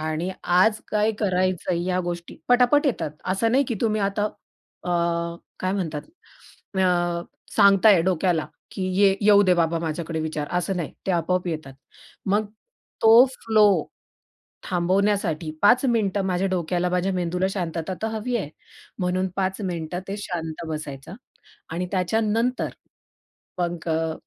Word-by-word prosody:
आणि 155 Hz, +3 st, -2 dB
आज 190 Hz, +5 st, +3 dB
काय 210 Hz, +1 st, +2 dB
करायचंय 185 Hz, -3 st, 0 dB
या 185 Hz, 0 st, +1 dB
गोष्टी 175 Hz, -1 st, -5 dB
पटापट 250 Hz, +4 st, +4 dB
येतात. 240 Hz, -, -1 dB
असं 195 Hz, +5 st, 0 dB
नाही 275 Hz, +2 st, +4 dB
की 235 Hz, -, -1 dB
तुम्ही 215 Hz, -2 st, +1 dB
आता 200 Hz, +1 st, 0 dB
अ, 205 Hz, -3 st, -9 dB, 0.7 s
काय 185 Hz, 0 st, 0 dB
म्हणतात 160 Hz, -7 st, -3 dB, 0.8 s
अ, 175 Hz, -2 st, +1 dB, 0.3 s
सांगताय 200 Hz, -2 st, +6 dB
डोक्याला, 175 Hz, -2 st, +1 dB, 0.2 s
की 190 Hz, -, -5 dB, 0.2 s
ये 195 Hz, -1 st, +5 dB
येऊदे 205 Hz, -3 st, +5 dB
बाबा 165 Hz, -1 st, +1 dB
माझ्याकडे 160 Hz, 0 st, -3 dB
विचार, 155 Hz, -2 st, -3 dB
असं 180 Hz, +2 st, -2 dB
नाही. 170 Hz, -4 st, -4 dB
ते -, -, +1 dB
आपोआप 180 Hz, +1 st, 0 dB
येतात. 155 Hz, -5 st, -5 dB, 0.5 s
मग 205 Hz, +2 st, +1 dB, 0.6 s
तो 225 Hz, +3 st, +8 dB
फ्लो 220 Hz, -4 st, +3 dB, 1.0 s
थांबवण्यासाठी 180 Hz, -2 st, 0 dB
5 245 Hz, +6 st, +5 dB
मिनिटं 210 Hz, -5 st, +1 dB
माझ्या 185 Hz, +1 st, 0 dB
डोक्याला, 180 Hz, 0 st, 0 dB
माझ्या 180 Hz, +2 st, 0 dB
मेंदूला 180 Hz, +1 st, 0 dB
शांतता 175 Hz, -2 st, -3 dB
तर 220 Hz, -, 0 dB
हवी 225 Hz, +2 st, -3 dB
आहे. 190 Hz, -10 st, -4 dB, 0.5 s
म्हणून 185 Hz, 0 st, 0 dB
5 190 Hz, +1 st, -1 dB
मिनिटं 175 Hz, -2 st, -3 dB
ते 200 Hz, +1 st, -4 dB
शांत 170 Hz, -5 st, -5 dB
बसायचा 150 Hz, -1 st, -6 dB, 0.6 s
आणि 175 Hz, +2 st, -2 dB
त्याच्यानंतर 220 Hz, +6 st, 0 dB, 0.9 s
मग 175 Hz, -1 st, -2 dB
अ, 160 Hz, 0 st, 0 dB
185 Hz, 135 wpm, -24 LUFS, 170-205 Hz, 1.0 s, तो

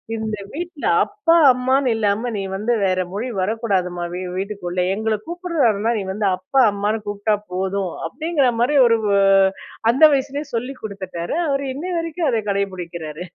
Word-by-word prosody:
"இந்த 220 Hz, -1 st, -3 dB, 0.2 s
வீட்டில 345 Hz, -1 st, -6 dB, 0.2 s
அப்பா, 400 Hz, -5 st, +1 dB, 0.2 s
அம்மான்னு 255 Hz, 0 st, +1 dB
இல்லாம 220 Hz, +2 st, 0 dB
நீ -, -, -2 dB
வந்து 220 Hz, +5 st, 0 dB
வேற 185 Hz, -1 st, +1 dB
மொழி 230 Hz, +6 st, -3 dB
வரக்கூடாதும்மா. 185 Hz, -5 st, -1 dB
வீ 180 Hz, -, -4 dB, 0.2 s
வீட்டுக்குள்ள 190 Hz, -3 st, -3 dB
எங்கள 220 Hz, 0 st, -1 dB
கூப்பிடுறனா 290 Hz, -, 0 dB
நீ -, -, -3 dB
வந்து 210 Hz, 0 st, 0 dB
அப்பா 260 Hz, +9 st, +1 dB
அம்மான்னு 205 Hz, +2 st, -2 dB
கூப்பிட்டா 205 Hz, +1 st, 0 dB, 0.2 s
போதும்." 190 Hz, -1 st, -2 dB
அப்படிங்கிற 300 Hz, -, 0 dB
மாதிரி 285 Hz, +4 st, +3 dB
ஒரு 230 Hz, -1 st, +4 dB, 0.9 s
அந்த 270 Hz, +6 st, +1 dB
வயசுலயே 280 Hz, +2 st, -1 dB
சொல்லிக் 250 Hz, +3 st, -4 dB
கொடுத்துட்டாரு 190 Hz, -, -5 dB
அவரு. 275 Hz, 0 st, 0 dB
இன்னைய 355 Hz, +5 st, -4 dB
வரைக்கும் 330 Hz, -2 st, -1 dB
அத 225 Hz, -2 st, +1 dB
கடைப்பிடிக்கிறாரு. 175 Hz, -5 st, -4 dB
220 Hz, 145 wpm, -21 LUFS, 195-275 Hz, 0.9 s, ஒரு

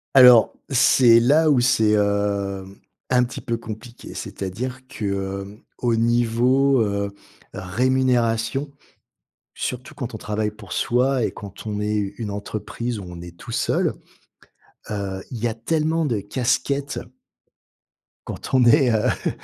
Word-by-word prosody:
Alors, 125 Hz, -3 st, +8 dB, 0.2 s
c'est 120 Hz, -2 st, +6 dB
là 150 Hz, +6 st, +4 dB
où 135 Hz, -4 st, +4 dB
c'est, 110 Hz, -4 st, +3 dB
hem, 100 Hz, -2 st, 0 dB, 0.3 s
un 125 Hz, -1 st, +4 dB
petit 125 Hz, -, -5 dB
peu 115 Hz, -3 st, -2 dB
compliqué. 115 Hz, +2 st, -9 dB
C'est-à-dire 125 Hz, +7 st, -5 dB
que, 115 Hz, -6 st, -6 dB
heu, 100 Hz, +1 st, -4 dB, 0.2 s
au 120 Hz, -2 st, +1 dB
niveau, 120 Hz, +3 st, +3 dB
heu, 100 Hz, -1 st, -1 dB, 0.4 s
rémunération, 125 Hz, +4 st, +1 dB, 0.9 s
surtout 125 Hz, 0 st, -5 dB
quand 125 Hz, -4 st, -5 dB
on -, -, -4 dB
travaille 105 Hz, 0 st, -2 dB
pour 105 Hz, -3 st, -14 dB
soi 125 Hz, +1 st, +1 dB
et -, -, 0 dB
quand 100 Hz, +1 st, -10 dB
on 105 Hz, -1 st, -3 dB
est 105 Hz, 0 st, -1 dB
u 100 Hz, -1 st, -1 dB
une 110 Hz, -3 st, -3 dB
entreprise 110 Hz, +3 st, -4 dB
où -, -, -7 dB
on 85 Hz, -1 st, -9 dB
est 85 Hz, -1 st, -10 dB
tout -, -, -10 dB
seul, -, -, +1 dB, 1.0 s
heu, 95 Hz, -2 st, -4 dB
il 120 Hz, -, -5 dB
y 120 Hz, -, +1 dB
a 110 Hz, -, -2 dB
tellement 160 Hz, +6 st, 0 dB
de 115 Hz, -7 st, 0 dB
casquettes 135 Hz, +6 st, -1 dB, 1.3 s
quand -, -, -7 dB
on 130 Hz, -1 st, +5 dB
est, 135 Hz, 0 st, +5 dB
heu, 110 Hz, -1 st, +1 dB, 0.2 s
on -, -, +3 dB
115 Hz, 145 wpm, -22 LUFS, 100-125 Hz, 1.3 s, Alors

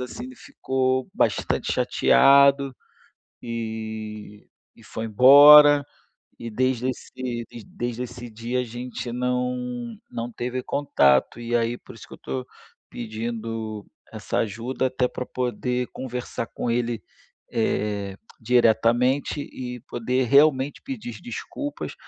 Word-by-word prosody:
assim, 125 Hz, -, -6 dB
ele 260 Hz, 0 st, -10 dB
ficou 130 Hz, -, -2 dB
bastante -, -, 0 dB
chateado, 140 Hz, -, +4 dB, 0.7 s
e 110 Hz, -2 st, -6 dB, 0.3 s
e 115 Hz, -, -19 dB
foi 110 Hz, 0 st, -6 dB
embora, 145 Hz, +5 st, +8 dB, 0.5 s
e 115 Hz, -, -7 dB
desde 130 Hz, +2 st, 0 dB
esse 125 Hz, -2 st, -5 dB, 0.2 s
desde 120 Hz, +1 st, -4 dB
esse 120 Hz, 0 st, -8 dB
dia 115 Hz, +3 st, -3 dB
a -, -, 0 dB
gente 120 Hz, +1 st, -6 dB
não 125 Hz, -1 st, -2 dB, 0.2 s
não 115 Hz, +1 st, -4 dB
teve 125 Hz, +2 st, -3 dB
contato 70 Hz, -, +2 dB
e 120 Hz, 0 st, -2 dB
aí 120 Hz, +1 st, 0 dB
por -, -, -14 dB
isso -, -, -12 dB
que -, -, -12 dB
eu -, -, -11 dB
tô 65 Hz, -1 st, -5 dB, 0.4 s
pedindo 115 Hz, -2 st, -5 dB, 0.3 s
essa -, -, -3 dB
ajuda 120 Hz, +5 st, -2 dB
até 130 Hz, 0 st, 0 dB
pra 125 Hz, -, -6 dB
poder 125 Hz, 0 st, -2 dB
conversar 125 Hz, -2 st, -5 dB
com 120 Hz, -, -4 dB
ele, 120 Hz, -1 st, -1 dB, 0.5 s
eh, 100 Hz, -3 st, -1 dB, 0.2 s
diretamente 120 Hz, +4 st, +2 dB
e 125 Hz, -3 st, -7 dB
poder 125 Hz, +3 st, -1 dB
realmente 140 Hz, 0 st, +3 dB
pedir 245 Hz, -3 st, -7 dB
desculpas, 290 Hz, +4 st, -6 dB
125 Hz, 120 wpm, -24 LUFS, 115-130 Hz, 0.7 s, embora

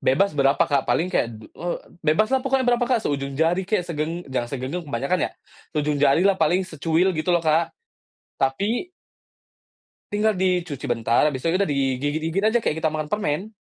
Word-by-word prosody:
Bebas 195 Hz, +10 st, +2 dB
berapa, 140 Hz, -1 st, +3 dB
Kak, 140 Hz, -3 st, +1 dB
paling 180 Hz, +3 st, +1 dB
kayak, 115 Hz, -, +1 dB, 0.2 s
eee, 175 Hz, +8 st, -5 dB, 0.2 s
bebaslah 215 Hz, +12 st, +2 dB
pokoknya 265 Hz, 0 st, +1 dB
berapa, 245 Hz, 0 st, +2 dB
Kak, 240 Hz, -4 st, +1 dB
seujung 140 Hz, -1 st, -2 dB
jari 175 Hz, +4 st, +1 dB
kek 205 Hz, -4 st, +1 dB
segeng 165 Hz, +1 st, -3 dB
jangan 120 Hz, -2 st, -1 dB
segenggam 135 Hz, +7 st, -4 dB
kebanyakan 140 Hz, +7 st, -1 dB
ya, -, -, -19 dB, 0.5 s
seujung 150 Hz, -1 st, 0 dB
jarilah 180 Hz, +8 st, +4 dB
paling 175 Hz, +4 st, +3 dB
secuil 165 Hz, +2 st, +1 dB
gitu 155 Hz, +1 st, -3 dB
loh, 170 Hz, -1 st, +2 dB
Kak. 160 Hz, +2 st, +3 dB, 0.7 s
Tapi 205 Hz, -, -1 dB, 1.2 s
Tinggal 215 Hz, +1 st, +2 dB
dicuci 180 Hz, -6 st, -1 dB
bentar, 115 Hz, 0 st, +2 dB
abis 150 Hz, -3 st, +1 dB
itu 165 Hz, +6 st, -1 dB
bisa -, -, +4 dB
kita -, -, 0 dB
digigit-gigit 145 Hz, +6 st, -1 dB
aja 220 Hz, +2 st, +3 dB
kayak 190 Hz, -9 st, -1 dB
kita 160 Hz, -, +2 dB
makan 155 Hz, -1 st, -3 dB
permen. 205 Hz, +2 st, -2 dB
165 Hz, 170 wpm, -23 LUFS, 145-190 Hz, 1.2 s, jarilah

